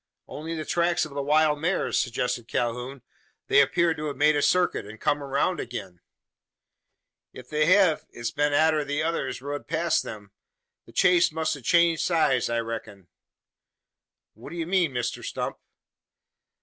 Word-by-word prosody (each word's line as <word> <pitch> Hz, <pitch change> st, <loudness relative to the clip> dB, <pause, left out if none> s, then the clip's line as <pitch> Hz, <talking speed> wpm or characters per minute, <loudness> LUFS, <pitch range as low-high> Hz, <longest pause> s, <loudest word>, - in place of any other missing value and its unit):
"Only 160 Hz, +2 st, -6 dB
the 155 Hz, -1 st, -5 dB
tracks 175 Hz, 0 st, +1 dB
of 150 Hz, -, -10 dB
the 140 Hz, -, -2 dB
wild 150 Hz, +1 st, +2 dB
mares!" 175 Hz, +3 st, 0 dB
suggested 120 Hz, -1 st, -2 dB
Calhoun. 125 Hz, +3 st, -3 dB, 0.4 s
"They 140 Hz, -, +5 dB
appear 170 Hz, +4 st, +2 dB
to 155 Hz, -1 st, -6 dB
have 145 Hz, -3 st, -4 dB
made 150 Hz, +1 st, +4 dB
a 145 Hz, -, +1 dB
circuit, 180 Hz, +4 st, +2 dB
and 105 Hz, +2 st, -11 dB
come 145 Hz, -, 0 dB
round 140 Hz, +6 st, 0 dB
again?" 95 Hz, -7 st, -7 dB, 1.3 s
"If 125 Hz, -, -12 dB
they 155 Hz, 0 st, +1 dB
hev 185 Hz, -4 st, +4 dB
it's 120 Hz, 0 st, -5 dB
been 145 Hz, 0 st, 0 dB
arter 155 Hz, +1 st, +3 dB
the 145 Hz, +1 st, -2 dB
others 135 Hz, -6 st, -2 dB
rud 145 Hz, +1 st, -5 dB
past 165 Hz, +1 st, +1 dB
them. 105 Hz, -2 st, -9 dB, 0.6 s
The -, -, -14 dB
chase 180 Hz, -2 st, +4 dB
must 160 Hz, 0 st, -1 dB
a 145 Hz, -, -11 dB
changed 170 Hz, +4 st, +3 dB
sides, 155 Hz, -9 st, +2 dB
I 115 Hz, 0 st, 0 dB
reck'n." 110 Hz, -5 st, -7 dB, 1.2 s
"What 115 Hz, +6 st, -12 dB
do 170 Hz, -, -8 dB
you 165 Hz, -1 st, -3 dB
mean, 175 Hz, -3 st, +1 dB
Mr 120 Hz, -2 st, -3 dB
Stump?" -, -, -4 dB
150 Hz, 160 wpm, -26 LUFS, 125-165 Hz, 1.3 s, They